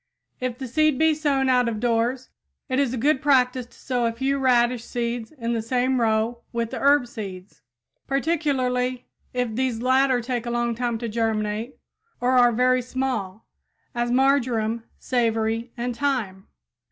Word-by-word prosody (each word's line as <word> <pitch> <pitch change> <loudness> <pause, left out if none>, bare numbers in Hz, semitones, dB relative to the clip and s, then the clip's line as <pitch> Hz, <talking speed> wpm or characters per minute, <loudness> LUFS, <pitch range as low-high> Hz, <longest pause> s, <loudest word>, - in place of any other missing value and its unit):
If 250 -1 -3
the 265 -1 -5
seed 310 +2 +2
be 320 +1 +4
sown 285 -3 +1
out 250 -2 +3
of 220 -2 -4
doors, 240 +2 0 0.4
it 260 +1 +1
is 275 -4 +1
a 255 - -3
good 270 +3 +2
practice 255 -3 +2
to - - -22
sow 245 -3 -1
a - - 0
few 265 +4 -1
radish 245 -2 +2
seeds 235 -1 -3
in 235 -6 -3
the 230 - -1
same 250 +2 0
row 225 +1 +1
with 235 -1 -2
the - - -4
herb 280 -2 +4
seeds, 195 -5 -9 0.5
particularly 260 -4 0 0.3
if 245 -3 -2
these 250 -1 -1
latter 260 +1 +3
take 240 0 -3
a - - -1
long 240 0 0
time 240 0 -2
to 235 +1 -4
germinate 220 +1 -2 0.4
or 250 +1 +1
are 245 -2 +5
very 250 +2 +3
small, 240 -6 -3 0.5
as 240 -1 -1
marjoram, 240 -4 +1
savory 230 -1 0
and 240 0 -3
thyme. 235 -9 -2
245 Hz, 165 wpm, -24 LUFS, 230-260 Hz, 0.5 s, are